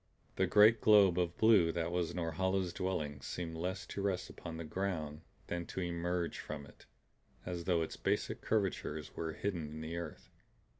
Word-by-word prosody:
The -, -, +2 dB
great 105 Hz, +2 st, +6 dB
globe 100 Hz, -4 st, +6 dB
of 85 Hz, -1 st, -1 dB
blue 105 Hz, -7 st, +6 dB
that 85 Hz, 0 st, -1 dB
was 90 Hz, -1 st, -1 dB
Norhala's 90 Hz, +2 st, 0 dB
dwelling 75 Hz, -6 st, -2 dB
seemed 80 Hz, +3 st, -4 dB
less 95 Hz, +4 st, -3 dB
to 100 Hz, -, -5 dB
rest 95 Hz, -2 st, -1 dB
upon 80 Hz, -2 st, -7 dB
the 85 Hz, -, -4 dB
ground 80 Hz, -3 st, -3 dB, 0.2 s
than 85 Hz, -1 st, -3 dB
to -, -, -5 dB
emerge 85 Hz, -1 st, -1 dB
from 75 Hz, -1 st, -6 dB
it; -, -, -18 dB, 0.6 s
as 90 Hz, -2 st, -4 dB
though 85 Hz, -3 st, +2 dB
its 80 Hz, -, -6 dB
basic -, -, -1 dB
curvatures 95 Hz, -7 st, -1 dB
were 80 Hz, -1 st, -3 dB
hidden 85 Hz, -5 st, -3 dB
in 80 Hz, +1 st, -7 dB
the 80 Hz, +2 st, -4 dB
earth. 85 Hz, -4 st, -7 dB
85 Hz, 170 wpm, -35 LUFS, 80-95 Hz, 0.6 s, great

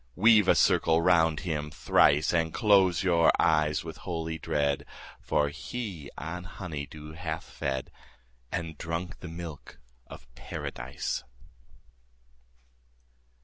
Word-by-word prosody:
50 -, -, -12 dB
Weave 110 Hz, -3 st, +6 dB
a -, -, +6 dB
circle 80 Hz, 0 st, +4 dB
round 85 Hz, -2 st, +3 dB
him 75 Hz, -4 st, -3 dB
thrice, 75 Hz, +1 st, +3 dB
And 80 Hz, -1 st, +1 dB
close 95 Hz, -4 st, +4 dB
your 85 Hz, -3 st, +4 dB
eyes 75 Hz, -1 st, +2 dB
with 80 Hz, -1 st, -8 dB
holy 80 Hz, -2 st, -4 dB
dread, 70 Hz, -1 st, 0 dB, 0.4 s
For 75 Hz, -1 st, +1 dB
he 95 Hz, -, -6 dB
on 90 Hz, +3 st, -5 dB
honey 80 Hz, -7 st, -6 dB
dew 75 Hz, +1 st, -10 dB
hath 80 Hz, -1 st, -4 dB
fed, 65 Hz, -1 st, -4 dB, 0.6 s
And 80 Hz, -3 st, -4 dB
drunk 85 Hz, +2 st, -4 dB
the 90 Hz, -, -8 dB
milk 85 Hz, -3 st, -8 dB, 0.3 s
of -, -, -11 dB
Paradise. 65 Hz, +2 st, -5 dB
80 Hz, 120 wpm, -28 LUFS, 75-90 Hz, 0.6 s, Weave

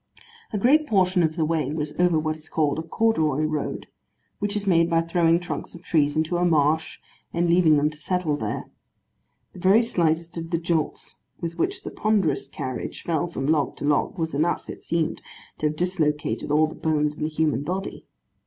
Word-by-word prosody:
A 210 Hz, -, -1 dB
great 295 Hz, +9 st, +4 dB
portion 185 Hz, -4 st, +3 dB
of 160 Hz, -1 st, +1 dB
the 160 Hz, -2 st, +1 dB
way 155 Hz, -3 st, 0 dB
was 150 Hz, -1 st, -3 dB
over 175 Hz, -2 st, +4 dB
what 155 Hz, 0 st, -1 dB
is 155 Hz, 0 st, -12 dB
called 150 Hz, -1 st, 0 dB
a -, -, -1 dB
corduroy 160 Hz, -5 st, +1 dB
road, 155 Hz, -1 st, -2 dB, 0.5 s
which 205 Hz, 0 st, -1 dB
is 205 Hz, -1 st, -2 dB
made 170 Hz, -3 st, +3 dB
by 165 Hz, -1 st, +3 dB
throwing 165 Hz, 0 st, +2 dB
trunks 175 Hz, -, -6 dB
of 175 Hz, -, -12 dB
trees 145 Hz, -3 st, +1 dB
into 160 Hz, +2 st, +1 dB
a 175 Hz, -, +1 dB
marsh, 160 Hz, -2 st, +2 dB, 0.4 s
and 170 Hz, +1 st, +1 dB
leaving 170 Hz, -3 st, +5 dB
them 150 Hz, +1 st, +2 dB
to 150 Hz, -, -10 dB
settle 165 Hz, -1 st, -1 dB
there. -, -, -3 dB, 0.9 s
The -, -, -11 dB
very 195 Hz, +6 st, +5 dB
slightest 170 Hz, -5 st, 0 dB
of 165 Hz, 0 st, -6 dB
the 165 Hz, -, +1 dB
jolts 165 Hz, -2 st, -2 dB, 0.2 s
with 170 Hz, 0 st, -5 dB
which 385 Hz, +2 st, -1 dB
the -, -, -6 dB
ponderous 200 Hz, -9 st, +1 dB
carriage 130 Hz, -2 st, -5 dB
fell 170 Hz, 0 st, 0 dB
from 135 Hz, -6 st, -4 dB
log 150 Hz, -1 st, +1 dB
to -, -, -4 dB
log, 145 Hz, +5 st, +1 dB
was 165 Hz, -1 st, -2 dB
enough, 155 Hz, +5 st, 0 dB
it -, -, -10 dB
seemed, 165 Hz, -1 st, -1 dB, 0.4 s
to 150 Hz, -, +2 dB
have 150 Hz, -, -3 dB
dislocated 155 Hz, -5 st, -1 dB
all 150 Hz, +2 st, +4 dB
the 155 Hz, -, -6 dB
bones 150 Hz, -1 st, 0 dB
in -, -, -11 dB
the 155 Hz, -, 0 dB
human 155 Hz, -3 st, 0 dB
body. 185 Hz, +6 st, -5 dB
165 Hz, 200 wpm, -24 LUFS, 155-175 Hz, 0.9 s, leaving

